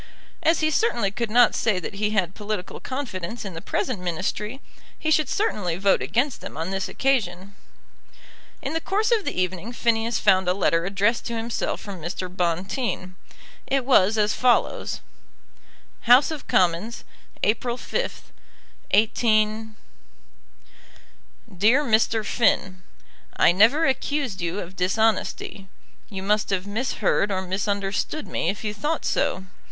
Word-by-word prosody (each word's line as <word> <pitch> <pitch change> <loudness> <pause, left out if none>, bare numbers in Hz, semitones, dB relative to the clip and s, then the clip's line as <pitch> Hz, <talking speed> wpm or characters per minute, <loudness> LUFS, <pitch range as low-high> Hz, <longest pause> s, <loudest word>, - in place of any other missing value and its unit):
As 325 0 +3
he 310 0 +2
certainly 240 - +1
could 235 +2 -3
not 245 +3 +5
say 215 -4 +1
that 180 - -5
he 210 +1 -1
had 190 -4 0
political 210 -3 -5
confidence 235 -6 -5
in 190 - -6
the 165 - -7
present 250 +3 -2
Ministry, 190 +7 -3 0.4
he 315 - -1
should 310 -3 +3
certainly 205 - -1
vote 195 +1 +3
against 255 +3 0
them - - -8
on 165 +4 -3
this 195 -1 -2
occasion. 200 -8 -1 1.1
In - - -3
the 325 - -1
course 425 +7 0
of 445 -4 +2
the - - -2
evening 185 +4 -2
Phineas 230 -1 0
found 190 -2 +3
a 180 - +2
letter 170 -3 +1
addressed 200 +4 0
to 235 -1 -3
himself 230 +1 -2
from 195 -4 -8
Mr. 180 +2 -5
Bonteen. 185 +2 -2 0.5
It 270 -2 0
was 220 -5 +4
as 210 0 +2
follows: 250 -2 +1 1.1
House 250 +6 +7
of 310 -3 -6
Commons, 185 +6 +1 0.4
April 235 +3 +1
5th, - - -4 0.6
18. 215 0 +2 1.8
DEAR 225 +10 +4
MR. 225 -3 +2
FINN, 185 -5 +1 0.6
I - - +6
never 230 - +4
accused 265 -6 -1
you 170 +4 -2
of 180 +2 -9
dishonesty. 195 0 0 0.4
You 190 -2 -6
must 210 +2 +1
have 190 -1 -1
misheard 210 -1 0
or 190 -1 -1
misunderstood 200 +8 -2
me - - -1
if 200 - -4
you 210 -1 -2
thought 300 +8 -2
so. 190 - 0
210 Hz, 140 wpm, -24 LUFS, 185-245 Hz, 1.8 s, House